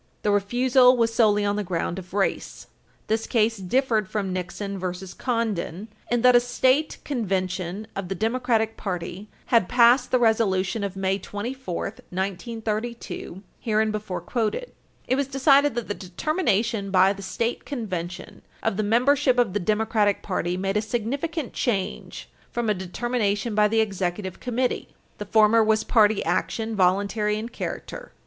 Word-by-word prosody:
The 210 - +2
refusal 250 +5 +4
was 230 -1 +2
solely 210 -3 +3
on 205 0 0
the 210 - -1
ground 175 0 -2
of 185 -1 -12
race. 200 -1 -1 0.4
This 220 +1 -1
case 225 -1 +2
differed 215 +1 0
from 195 -3 -2
Nixon 195 +2 -4
v. 185 - -5 0.3
Condon, 220 -5 -2
supra, 215 +2 -8
in 240 - +1
that 250 -1 +7
a - - +9
state 255 +4 +1
convention 190 - -2
of 195 -2 -4
the 195 - -2
Democratic 225 +1 0
party 190 +1 -5 0.2
had 225 -6 +4
passed 245 +1 +5
the 255 - +3
resolution 220 -3 +1
of 195 -1 -3
May 195 0 0
24, 205 0 -5 0.3
1932, 215 +1 -4 0.2
hereinbefore 215 -4 -1
quoted. 235 - -2 0.4
It 260 - +2
was 280 -1 0
decided 275 0 +4
that 240 -2 -3
the 205 - -2
determination 215 - -1
by 190 +1 +4
the 200 - -10
state 230 +5 -2
convention 185 - -5 0.2
of 195 - 0
the - - +1
membership 255 +5 +3
of 235 -6 +2
the 205 - 0
Democratic 215 +1 +1
party 180 -2 -2
made 195 +2 -1
a - - +2
significant 260 +7 -3
change 200 -7 -3 0.2
from 235 -2 -1
a - - +3
determination 205 +3 -1
by 210 0 +4
the 225 +1 +2
Executive 190 -2 -3
Committee. 250 0 -1 0.3
The 210 - -4
former 220 +2 +5
was 220 0 +2
party 220 -3 +3
action, 225 -1 -1
voluntary 200 +3 +1
in 225 +2 -5
character. - - -6
215 Hz, 155 wpm, -24 LUFS, 195-240 Hz, 0.4 s, a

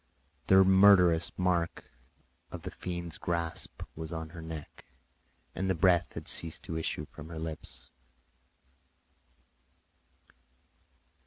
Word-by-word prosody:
The 95 0 +7
murderous 95 -3 +6
mark 90 -2 0 0.7
of - - -8
the - - -5
fiend's 85 -2 -6
grasp 85 -2 -2
was 80 0 -7
on 80 -1 -5
her 85 0 -9
neck, 80 -2 -9 0.7
and 95 0 -2
the 95 - +2
breath 85 +1 +3
had - - -7
ceased 80 -1 +1
to 80 - -5
issue 80 -2 -2
from 75 +1 -12
her 80 - -7
lips. 75 -6 -6
85 Hz, 110 wpm, -30 LUFS, 80-90 Hz, 0.7 s, The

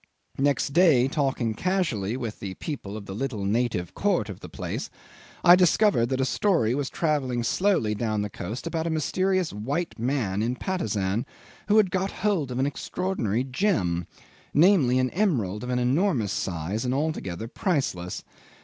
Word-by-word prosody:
Next 140 0 +2
day, 155 -7 +5
talking 135 -5 0
casually 130 - -1
with 115 -4 -5
the 95 -2 -5
people 110 - -5
of 105 - -8
the 95 - -7
little 110 -3 -3
native 105 -4 0
court 185 - 0
of 100 - -7
the - - -10
place, - - -5 0.5
I 175 - +9
discovered 180 - +4
that 130 +1 -1
a 130 - +2
story 130 - +2
was 140 0 -1
travelling 135 -7 0
slowly 175 - +1
down 110 -1 -1
the 105 - -3
coast 110 - -6
about 165 -1 -2
a - - 0
mysterious 185 +3 0
white 135 - -3
man 115 -6 0
in 120 +3 0
Patusan 110 - -1 0.4
who 210 +1 +4
had 200 -4 +4
got 190 +1 0
hold 195 -11 -1
of 125 - -3
an 130 - +2
extraordinary 140 - -2
gem 130 - 0 0.5
namely, 150 -6 +5
an 130 0 +1
emerald 125 - 0
of 125 - -5
an 125 - 0
enormous 125 - +1
size, 90 +5 -2
and 125 0 0
altogether 115 - -2
priceless. 130 - -2
130 Hz, 165 wpm, -26 LUFS, 110-170 Hz, 0.5 s, I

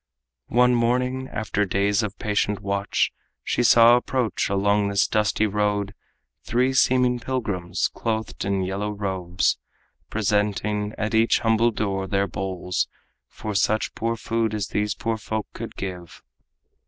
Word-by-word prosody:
One 125 +1 +4
morning, 125 +2 +1
after 105 -1 -1
days 100 +3 +1
of 105 -1 -4
patient 105 -2 0
watch, 100 0 0 0.3
She - - 0
saw 120 0 +7
approach 125 -5 -1
along 100 +1 +2
this 100 0 +2
dusty 105 0 +1
road 105 -1 0 0.5
Three 125 +3 +1
seeming 125 -1 +3
pilgrims, 105 -9 -2
clothed 110 -1 -3
in 95 -1 0
yellow 100 +3 -2
robes, 95 -3 -1 0.5
Presenting 105 0 0
at 110 +1 -2
each 110 +1 +3
humble 115 +1 +3
door 100 -4 -2
their 100 0 +1
bowls 95 -1 -2 0.4
For 110 - -6
such 110 +2 +1
poor 115 +1 -1
food 115 -1 -1
as 105 -2 -3
these 105 0 -1
poor 115 -1 -2
folk 110 0 -3
could - - -7
give. 90 -3 -7
105 Hz, 135 wpm, -24 LUFS, 100-115 Hz, 0.5 s, saw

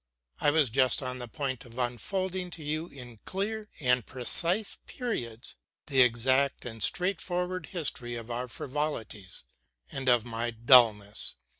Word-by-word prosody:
I - - +3
was 145 -5 +3
just 130 +1 +3
on 130 0 -4
the 125 - -6
point 130 -1 -4
of 120 0 -14
unfolding 180 - -2
to 160 - -10
you 155 +3 -2
in 125 -7 -11
clear 210 +3 -3
and 125 -4 +2
precise 170 - +3
periods 120 - -5 0.3
the 135 -3 +4
exact 130 +3 +2
and 115 -2 -7
straightforward 180 - 0
history 140 -9 -4
of 115 0 -7
our 125 +2 -3
frivolities 125 -8 -3 0.5
and 135 -1 -1
of 120 -2 +4
my 120 0 -3
dulness. 115 -3 +4
130 Hz, 140 wpm, -29 LUFS, 120-165 Hz, 0.5 s, the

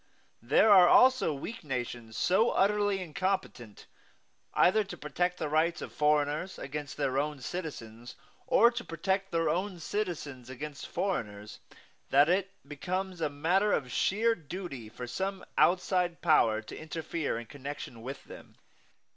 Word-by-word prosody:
There 140 - +4
are 185 -3 +9
also 255 -9 +5
weak 185 - -6
nations 120 -5 -5
so 220 +6 +3
utterly 205 -1 +2
incompetent 180 - -3 0.7
either 215 +4 +4
to 195 - -9
protect 180 +5 -1
the 155 - -2
rights 160 +3 +1
of - - -8
foreigners 150 +4 +1
against 145 +1 -6
their 135 -2 0
own 150 0 -2
citizens, 125 -7 -7 0.3
or 235 +2 +6
to 235 - -5
protect 190 +4 -2
their 165 -1 0
own 180 +3 -1
citizens 155 - -4
against 145 +3 -7
foreigners, 105 - -3 0.5
that 145 +3 +5
it 190 +2 +2 0.2
becomes 185 +5 -4
a 155 - +1
matter 175 +8 +1
of 125 -4 -1
sheer 225 +4 +2
duty 155 - -7
for 120 +2 -7
some 190 +10 -4
outside 180 -1 +2
power 115 -9 +4
to - - -9
interfere 155 -3 -3
in 120 - -6
connection 140 -3 -8
with 135 +4 -7
them. - - -13
160 Hz, 140 wpm, -30 LUFS, 135-190 Hz, 0.7 s, are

